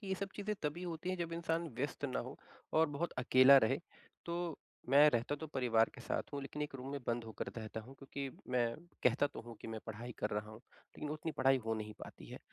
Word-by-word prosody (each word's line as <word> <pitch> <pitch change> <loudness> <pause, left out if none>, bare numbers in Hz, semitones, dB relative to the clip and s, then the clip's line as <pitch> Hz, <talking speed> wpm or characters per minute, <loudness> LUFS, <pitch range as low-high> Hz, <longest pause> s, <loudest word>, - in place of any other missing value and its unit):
कि 200 - -9
ये 190 - +1
सब 195 +1 -3
चीज़ें 210 +1 -1
तभी 150 +4 -1
होती 175 0 -3
है, 185 - -1
जब 170 -1 -3
इंसान 165 0 0
व्यस्त 145 +2 -2
ना 130 -3 0
हो 130 +4 -7 0.4
और 160 +1 +5
बहुत 145 +4 -2
अकेला 130 +2 +8
रहे, 130 +3 +3 0.5
तो 170 -2 -2 0.3
मैं 145 +2 +9
रहता 120 +3 +1
तो 160 - -3
परिवार 120 -6 +3
के - - -10
साथ - - -2
हूँ, 140 - -2
लेकिन 145 +2 -4
1 145 - -4
रूम 130 0 -6
में 140 - -3
बंद 115 -1 0
होकर 110 - -5
रहता 110 0 -4
हूँ, 130 +5 -12
क्योंकि 140 0 -5 0.2
मैं 120 -2 +2 0.3
कहता 125 +4 +4
तो - - -8
हूँ 120 - -7
कि - - -7
मैं 110 - -3
पढ़ाई 115 +2 -6
कर 105 - 0
रहा 105 +1 -2
हूँ, 110 - -10
लेकिन 145 +4 -9
उतनी 155 +1 -3
पढ़ाई 135 0 +6
हो 110 - +2
नहीं 110 -1 -4
पाती - - -9
है। - - -8
140 Hz, 240 wpm, -36 LUFS, 120-160 Hz, 0.5 s, मैं